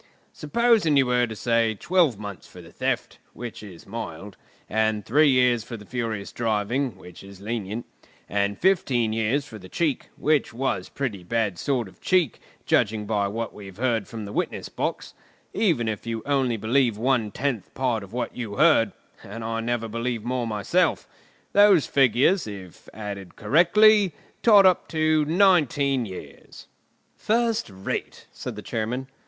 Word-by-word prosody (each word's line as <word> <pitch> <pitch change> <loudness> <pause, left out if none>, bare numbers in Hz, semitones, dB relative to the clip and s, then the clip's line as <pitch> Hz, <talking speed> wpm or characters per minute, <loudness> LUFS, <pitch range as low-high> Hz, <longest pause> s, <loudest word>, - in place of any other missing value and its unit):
Supposing 210 -2 +2
you 135 - +5
were 125 -1 +2
to 110 - -7
say 115 0 +1
twelve 175 - +2
months 100 -2 -8
for - - -14
the - - -13
theft, - - -2
which 120 -1 -7
is 95 -5 -12
mild; 100 -2 -7 0.3
and 110 -1 0
three 150 +4 +4
years 125 -3 +3
for 115 - -7
the 105 - -13
furious 115 -4 -4
driving, 115 +1 -1
which 90 -1 -13
is 100 -1 -12
lenient; 110 +1 -4 0.4
and 100 0 -1
fifteen 125 - +2
years 115 +6 0
for 110 -7 -10
the 95 -1 -12
cheek, 155 - -1
which 150 -6 +1
was 125 -7 -2
pretty 125 -9 -4
bad 105 -1 -1
sort 125 -6 -1
of 95 - -18
cheek, 180 -8 +1 0.3
judging 105 0 +1
by 100 -1 0
what 115 +2 -4
we've 95 -2 -11
heard 115 -4 0
from 110 -3 -7
the 100 - -8
witness - - -3
box, - - -4 0.4
even 165 - +1
if 110 +1 -4
you 115 -1 -3
only 135 -5 +1
believe 115 +1 +1
one 120 -2 +1
tenth 120 -3 -3
part 125 -4 0
of 100 -1 -11
what 120 0 -4
you 110 -5 -5
heard, - - +4 0.3
and 110 +3 -8
I 115 0 -2
never 115 0 -2
believe 115 0 -3
more 125 0 -2
myself—those 180 - +1
figures, 135 - +3
if 95 -4 -10
added 100 -3 -7
together 105 - -9
correctly, 200 - +5 0.3
tot 210 -4 +7
up 185 -2 +4
to 155 -1 +2
nineteen 155 - +3
years——" 95 -2 -11 0.5
"First 230 - 0
rate!" 95 0 -5
said - - -7
the - - -8
Chairman. 115 +4 -3
115 Hz, 160 wpm, -25 LUFS, 105-140 Hz, 0.5 s, tot